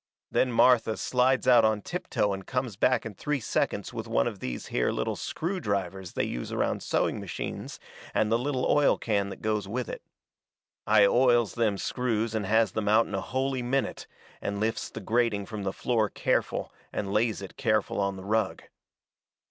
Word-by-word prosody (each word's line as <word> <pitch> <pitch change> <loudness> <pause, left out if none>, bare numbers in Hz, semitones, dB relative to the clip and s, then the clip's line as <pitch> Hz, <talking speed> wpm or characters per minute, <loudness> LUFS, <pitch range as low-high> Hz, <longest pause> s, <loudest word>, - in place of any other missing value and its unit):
Then 130 - +2
Martha 115 -2 +4
slides 130 +1 +2
out 120 -3 +7
on 110 -2 +2
tiptoe 105 - -1
and 95 -1 -7
comes 125 -5 -2
back 125 +4 +2
in 110 - -5
three 145 +8 -2
seconds 115 - -1
with - - -5
one 60 - +2
of - - -3
these 60 -1 -5
here - - +1
little - - -1
screw 185 +4 -3
drivers 95 - -3
they - - 0
use - - -4
around - - 0
sewing - - 0
machines - - -6 0.3
and 110 0 +1
the 115 - +3
little 130 0 -1
oil 145 -1 +4
can 100 -3 0
that 95 - -9
goes 105 -2 0
with 120 +5 -3
it. - - -6 0.9
I 105 -1 +6
oils 120 0 +4
them 110 -4 +1
screws 115 -1 -1
and 105 -3 -1
has 110 -1 +3
them 105 +1 -2
out 110 +2 +5
in - - -9
a 95 - -1
holy 130 +3 -1
minute, 130 +3 -1 0.3
and 100 0 -3
lifts 110 +1 -1
the - - -8
grating 115 -3 +1
from 110 +1 -6
the 95 -1 -1
floor 110 0 0
careful - - -1 0.2
and 100 -1 -3
lays 110 -1 +1
it 95 - -9
careful 110 -2 0
on 100 -1 0
the 95 - -9
rug. 110 -1 0
110 Hz, 190 wpm, -28 LUFS, 100-125 Hz, 0.9 s, out